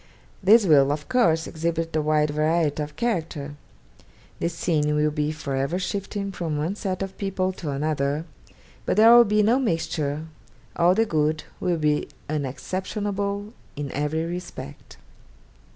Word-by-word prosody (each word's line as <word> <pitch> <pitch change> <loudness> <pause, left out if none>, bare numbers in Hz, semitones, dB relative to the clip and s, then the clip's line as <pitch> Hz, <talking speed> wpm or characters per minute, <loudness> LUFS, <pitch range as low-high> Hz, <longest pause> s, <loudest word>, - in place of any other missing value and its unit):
This 210 +3 +6
will 140 -5 +5
of 150 +1 -4
course 165 -11 +2
exhibit 165 0 -2
a 155 - +2
wide 150 0 +2
variety 155 0 +1
of 150 0 -5
character. 160 -11 -2 0.9
The 170 - 0
scene 150 -3 0
will 150 0 +2
be 150 0 -1
for 155 -3 -4
ever 140 +6 0
shifting 200 +1 -3
from 165 -5 -3
one 155 +6 -1
set 195 -3 -3
of 195 0 -8
people 190 -2 -1
to 180 -4 -6
another, 145 +1 -1 0.6
but - - +1
there 225 +2 +8
will 240 0 +8
be 210 0 +3
no 235 +5 +3
mixture, 160 - -1 0.5
all 175 +2 +4
the 225 +2 +3
good 155 -4 0 0.2
will 180 -2 0
be 150 -1 +1 0.2
unexceptionable 200 - -3 0.2
in 145 -2 -4
every 150 +3 -1
respect. 175 - -8
160 Hz, 150 wpm, -24 LUFS, 150-195 Hz, 0.9 s, there